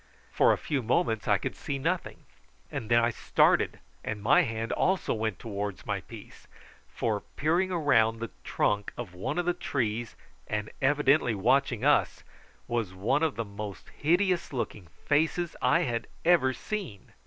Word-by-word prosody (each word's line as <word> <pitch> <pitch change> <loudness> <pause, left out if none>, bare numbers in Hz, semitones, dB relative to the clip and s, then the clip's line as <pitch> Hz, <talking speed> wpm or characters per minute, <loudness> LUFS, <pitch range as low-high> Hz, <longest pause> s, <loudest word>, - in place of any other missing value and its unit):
For - - +4
a - - +2
few 140 -3 -2
moments 110 -2 0
I - - +4
could - - -4
see 140 - -4
nothing; 170 +6 -2 0.5
then 110 - -5
I 115 0 +4
started, - - +2 0.3
and 110 -1 -3
my 110 +7 +5
hand 115 0 -3
also 190 0 +1
went 110 -3 -2
towards 100 -3 -5
my - - -2
piece, - - -13 0.4
for 110 -3 -1 0.2
peering 170 +6 +1
round 115 -10 +3
the 115 0 -5
trunk 105 0 0
of 115 -7 -6
one 115 - -3
of 175 - 0
the 175 - +2
trees, 120 -9 -2 0.3
and 105 0 -3
evidently 140 -3 +3
watching 125 +3 +2
us, 145 - +2 0.4
was 115 -6 -2
one 105 +10 +1
of 160 -3 +1
the 115 - -3
most 100 -1 -8
hideous 175 +3 +1
looking 110 -8 -4 0.2
faces 160 +3 +1
I 125 - +4
had 120 -2 -2 0.2
ever 165 -7 +5
seen. 155 - -6
120 Hz, 155 wpm, -28 LUFS, 110-150 Hz, 0.5 s, my